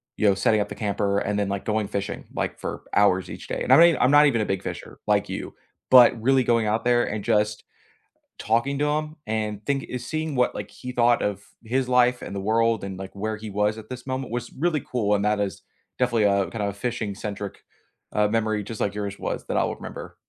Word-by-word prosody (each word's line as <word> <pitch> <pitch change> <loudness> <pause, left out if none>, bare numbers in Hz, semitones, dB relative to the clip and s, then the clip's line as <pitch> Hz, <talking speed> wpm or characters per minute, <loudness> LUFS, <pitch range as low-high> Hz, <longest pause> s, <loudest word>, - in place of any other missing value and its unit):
you 110 - +2
know, 100 - +3
setting 105 +2 +2
up 105 - -3
the - - -6
camper 100 -1 0
and 105 0 -1
then 100 -1 0
like 100 0 -3
going 110 -1 0
fishing, 100 0 -3
like, - - -2
for - - -5
hours 95 -3 +3
each - - -8
day - - -3
and - - +4
I'm - - +8
not 170 - +9
e 170 - +2
I'm 130 - +3
not 145 +1 +7
even 120 -5 +1
a 105 - 0
big 95 -1 -2
fisher, - - -7
like - - +2
you, - - -5 0.4
but 125 -2 +8
really 130 +2 +3
going 115 -2 +2
out 110 +2 0
there 120 0 +4
and 105 -1 -4
just 105 0 +1 0.7
talking 120 +6 0
to 145 - +2
him 155 +1 -1
and 105 -1 -3
think 140 -1 -1
eh, 125 - -3
seeing 155 +5 -3
what 125 -1 +2
like - - -6
he 125 - -8
thought 120 -1 +3
of 100 0 -2 0.2
his 125 +3 0
life 125 0 +3
and - - -7
the - - -2
world 115 +2 +1
and 95 -1 -6
like 95 0 -7
where 110 +2 -2
he 110 0 -7
was 105 +2 0
at 110 0 -11
this 125 0 -8
moment 130 -2 -3
was 120 0 -3
really 160 +1 0
cool, 105 -5 -1
and 100 - 0
that 105 0 +2
is 100 -1 -3 0.4
definitely 120 -3 +2
a 100 -1 +2
kinda 105 -3 -2
a 100 - -3
fishing-centric, 105 -2 -4 0.5
uh, 105 0 +3
memory 110 -1 0
just 110 +2 -7
like 100 0 -1
yours 100 -1 -4
was - - -4
that - - -1
I'll - - +1
remember. - - -9
110 Hz, 235 wpm, -24 LUFS, 105-125 Hz, 0.7 s, not